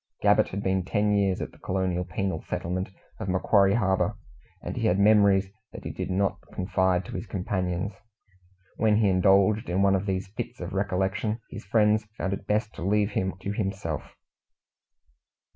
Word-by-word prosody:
Gabbett -, -, +5 dB
had 100 Hz, +1 st, -4 dB
been 95 Hz, -1 st, +1 dB
ten 105 Hz, +2 st, +1 dB
years 100 Hz, -2 st, +1 dB
at -, -, -4 dB
the -, -, -20 dB
colonial 90 Hz, -1 st, -1 dB
penal 95 Hz, -3 st, -3 dB
settlement 90 Hz, +3 st, -2 dB, 0.3 s
of 95 Hz, -, -4 dB
Macquarie 100 Hz, +2 st, +3 dB
Harbour, 95 Hz, -5 st, +1 dB, 0.5 s
and -, -, -4 dB
he -, -, 0 dB
had 90 Hz, -, +2 dB
memories 100 Hz, -2 st, +4 dB, 0.2 s
that -, -, -9 dB
he -, -, -4 dB
did -, -, -5 dB
not 95 Hz, +1 st, 0 dB
confide 95 Hz, -1 st, +1 dB
to -, -, -9 dB
his 115 Hz, -, -5 dB
companions. 95 Hz, 0 st, -2 dB, 0.8 s
When 110 Hz, -2 st, +3 dB
he 105 Hz, -2 st, +3 dB
indulged 95 Hz, +4 st, +3 dB
in 95 Hz, +3 st, +1 dB
one 100 Hz, -1 st, +4 dB
of 95 Hz, +1 st, 0 dB
these 95 Hz, 0 st, -2 dB
fits 110 Hz, +4 st, -6 dB
of 90 Hz, +2 st, -6 dB
recollection, 95 Hz, +3 st, -1 dB
his 110 Hz, -3 st, -8 dB
friends 105 Hz, +1 st, +3 dB
found 95 Hz, -, -1 dB
it 100 Hz, 0 st, -6 dB
best 105 Hz, +1 st, 0 dB
to -, -, -10 dB
leave 105 Hz, +2 st, +2 dB
him 95 Hz, -1 st, -1 dB
to 100 Hz, -, -3 dB
himself. 95 Hz, -7 st, -4 dB
95 Hz, 175 wpm, -27 LUFS, 95-105 Hz, 0.8 s, Gabbett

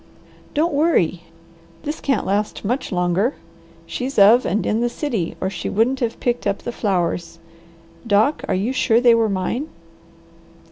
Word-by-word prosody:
"Don't 310 Hz, +2 st, +1 dB
worry! 235 Hz, -, +1 dB, 0.6 s
This 300 Hz, +2 st, -4 dB
can't 275 Hz, -, 0 dB
last 205 Hz, +2 st, -2 dB
much 245 Hz, +7 st, -2 dB
longer. 180 Hz, +7 st, +1 dB, 0.5 s
She's 260 Hz, +2 st, -5 dB
of 215 Hz, +5 st, +6 dB
and 210 Hz, +5 st, 0 dB
in 220 Hz, +2 st, 0 dB
the 240 Hz, -, +1 dB
city 235 Hz, -, -3 dB
or 185 Hz, -, -1 dB
she -, -, -4 dB
wouldn't 235 Hz, +6 st, +1 dB
have 230 Hz, -2 st, -2 dB
picked 240 Hz, -3 st, -1 dB
up 200 Hz, 0 st, -2 dB
the -, -, -3 dB
flowers. 180 Hz, -6 st, -2 dB, 0.7 s
Doc, 215 Hz, +8 st, +2 dB
are -, -, 0 dB
you 210 Hz, +8 st, -1 dB
sure 230 Hz, -3 st, +3 dB
they 240 Hz, -1 st, +5 dB
were 225 Hz, -1 st, +2 dB
mine?" 200 Hz, +9 st, -2 dB
225 Hz, 155 wpm, -21 LUFS, 195-255 Hz, 0.7 s, of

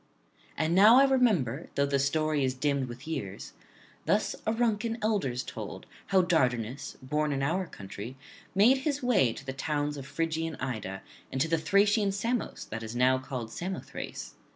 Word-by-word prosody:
And 160 Hz, +2 st, +1 dB
now 210 Hz, +6 st, +8 dB
I 270 Hz, -, +8 dB
remember, 210 Hz, -, +2 dB
though 140 Hz, -, +3 dB
the 140 Hz, 0 st, +1 dB
story 155 Hz, +1 st, +1 dB
is 130 Hz, 0 st, 0 dB
dimmed 140 Hz, 0 st, 0 dB
with 125 Hz, +4 st, -9 dB
years, 100 Hz, -12 st, -5 dB, 0.5 s
thus -, -, +2 dB
Auruncan 225 Hz, 0 st, +1 dB
elders 195 Hz, -, 0 dB
told, -, -, -7 dB, 0.2 s
how 190 Hz, -2 st, +4 dB
Dardanus, 125 Hz, -7 st, 0 dB
born 150 Hz, +3 st, 0 dB
in 135 Hz, -1 st, -1 dB
this 135 Hz, -, +2 dB
our 180 Hz, +3 st, -1 dB
country, 105 Hz, +2 st, -8 dB, 0.4 s
made 230 Hz, +7 st, +6 dB
his 285 Hz, 0 st, -2 dB
way 210 Hz, -, +4 dB
to -, -, -9 dB
the 130 Hz, -, -4 dB
towns 145 Hz, +1 st, -2 dB
of 135 Hz, -1 st, -7 dB
Phrygian 165 Hz, 0 st, -2 dB
Ida 110 Hz, -7 st, -4 dB, 0.3 s
and 135 Hz, -, -2 dB
to 155 Hz, -, +2 dB
the 165 Hz, 0 st, +1 dB
Thracian 200 Hz, +3 st, +3 dB
Samos 230 Hz, +4 st, -2 dB
that 110 Hz, +1 st, -4 dB
is 110 Hz, +1 st, -6 dB
now 130 Hz, +1 st, +4 dB
called 125 Hz, -4 st, -5 dB
Samothrace. 185 Hz, +8 st, -6 dB
150 Hz, 170 wpm, -29 LUFS, 130-200 Hz, 0.5 s, now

